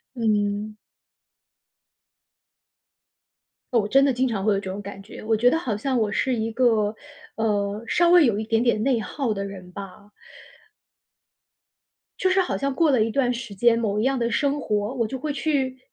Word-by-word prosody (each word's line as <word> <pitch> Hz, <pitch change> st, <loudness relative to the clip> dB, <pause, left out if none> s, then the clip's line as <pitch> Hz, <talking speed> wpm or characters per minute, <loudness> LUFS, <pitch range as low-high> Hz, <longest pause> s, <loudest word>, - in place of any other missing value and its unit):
嗯。 210 Hz, -2 st, 0 dB, 3.0 s
哦， 225 Hz, -4 st, +3 dB
真 270 Hz, +6 st, +4 dB
的 275 Hz, -2 st, +3 dB
经 255 Hz, +2 st, +1 dB
常 220 Hz, -6 st, -2 dB
会 210 Hz, -, +4 dB
有 195 Hz, -, 0 dB
这 190 Hz, -, -6 dB
种 200 Hz, -, -6 dB
感 200 Hz, -1 st, -9 dB
觉， 210 Hz, -, -11 dB
我 220 Hz, +1 st, +1 dB
觉 245 Hz, +3 st, +4 dB
得 320 Hz, -, +1 dB
好 235 Hz, -10 st, -2 dB
像 260 Hz, +4 st, -1 dB
我 215 Hz, -2 st, 0 dB
是 255 Hz, +4 st, 0 dB
一 225 Hz, -1 st, -2 dB
个， 220 Hz, -3 st, +2 dB, 0.4 s
呃， 210 Hz, -1 st, -1 dB
稍 345 Hz, +8 st, +3 dB
微 350 Hz, -2 st, +7 dB
有 225 Hz, -6 st, +2 dB
一 220 Hz, -, -2 dB
点 225 Hz, +1 st, +1 dB
点 235 Hz, -3 st, +1 dB
内 255 Hz, -1 st, +2 dB
耗 230 Hz, +1 st, -2 dB
的 200 Hz, -1 st, -3 dB
人 190 Hz, -2 st, -9 dB
吧。 200 Hz, +1 st, -10 dB, 2.1 s
就 375 Hz, -, +2 dB
是 380 Hz, +1 st, +3 dB
好 360 Hz, -, -2 dB
像 275 Hz, -1 st, -2 dB
过 320 Hz, +2 st, +3 dB
了 255 Hz, -5 st, +3 dB
一 225 Hz, -, -2 dB
段 250 Hz, 0 st, +1 dB
时 235 Hz, -4 st, -6 dB
间、 230 Hz, +3 st, +3 dB
某 210 Hz, -2 st, -1 dB
一 -, -, 0 dB
样 265 Hz, +2 st, +1 dB
的 235 Hz, -1 st, 0 dB
生 285 Hz, +2 st, 0 dB
活， 210 Hz, -2 st, -1 dB
我 235 Hz, -4 st, 0 dB
就 265 Hz, -, -5 dB
会 295 Hz, +3 st, -3 dB
去 275 Hz, -3 st, -1 dB
225 Hz, 200 characters per minute, -24 LUFS, 210-260 Hz, 3.0 s, 微